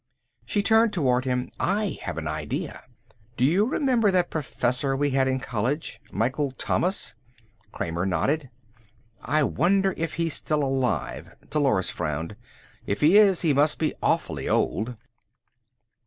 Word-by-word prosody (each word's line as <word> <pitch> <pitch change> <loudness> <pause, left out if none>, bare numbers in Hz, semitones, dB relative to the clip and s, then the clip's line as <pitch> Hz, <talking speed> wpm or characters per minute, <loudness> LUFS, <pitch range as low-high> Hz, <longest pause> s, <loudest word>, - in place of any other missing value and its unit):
She 205 - 0
turned 220 +1 +4
toward 130 -7 +1
him. 125 -1 -1
"I 205 +1 0
have - - -5
an 80 -1 -3
idea. 75 -1 -4 0.6
Do 125 - +3
you 180 +9 +3
remember 250 -4 +2
that 180 -2 +1
professor 135 -2 -1
we 145 +1 0
had 135 0 +2
in 130 0 0
college. 125 +6 -3
Michael 130 +7 0
Thomas?" 175 - -1 0.6
Kramer 85 +3 -2
nodded. 130 - 0 0.7
"I 150 +4 +1
wonder 190 +7 +2
if 165 -1 -3
he's 165 -1 -1
still 150 -1 0
alive." 135 -2 -2 0.2
Dolores 135 -11 +1
frowned. 80 +6 -3 0.5
"If 100 - -2
he 165 +8 +7
is 195 -5 +4
he 155 -4 +3
must 145 +3 +3
be 155 - 0
awfully - - 0
old." 115 +4 0
140 Hz, 140 wpm, -25 LUFS, 125-175 Hz, 0.7 s, he